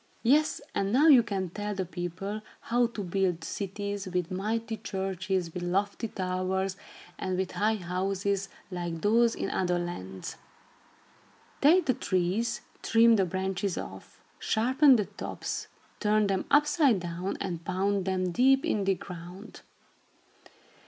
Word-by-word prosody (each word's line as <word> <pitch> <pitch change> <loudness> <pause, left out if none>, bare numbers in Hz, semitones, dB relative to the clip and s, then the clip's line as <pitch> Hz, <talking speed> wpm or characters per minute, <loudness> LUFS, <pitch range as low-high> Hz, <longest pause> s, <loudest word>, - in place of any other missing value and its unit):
"Yes, 295 +6 +3
and 195 0 0
now 270 +7 +4
you 265 -5 +9
can 195 -6 -3
tell 205 +1 -4
the 190 -1 -2
people 185 +4 -5 0.2
how 240 +1 +2
to 225 -3 -6
build 180 -2 0
cities, 200 +2 -4
with 180 -2 -2
mighty 220 +4 -2
churches 190 -3 -2
with 180 - -4
lofty 200 +5 -1
towers, 185 0 -2 0.4
and 185 -1 -2
with 190 0 -1
high 215 +2 +1
houses 195 +1 -1 0.2
like 175 -2 -3
those 230 +2 +4
in - - -3
other 180 -1 +1
lands. 95 - -5 1.2
Take 345 +6 +6
the 255 - +3
trees, 200 +5 0 0.2
trim 230 0 +5
the 195 -3 +3
branches 190 +1 -2
off, 95 0 -8 0.2
sharpen 260 +5 +4
the 210 -4 +1
tops, - - -5 0.3
turn 215 0 +3
them 195 -2 0
upside 295 - +4
down 175 +2 -4
and 175 -4 -4
pound 190 +2 0
them 185 -1 0
deep 265 +7 +4
in 205 -2 0
the 195 0 +3
ground. 180 +4 -10
195 Hz, 140 wpm, -29 LUFS, 180-220 Hz, 1.2 s, you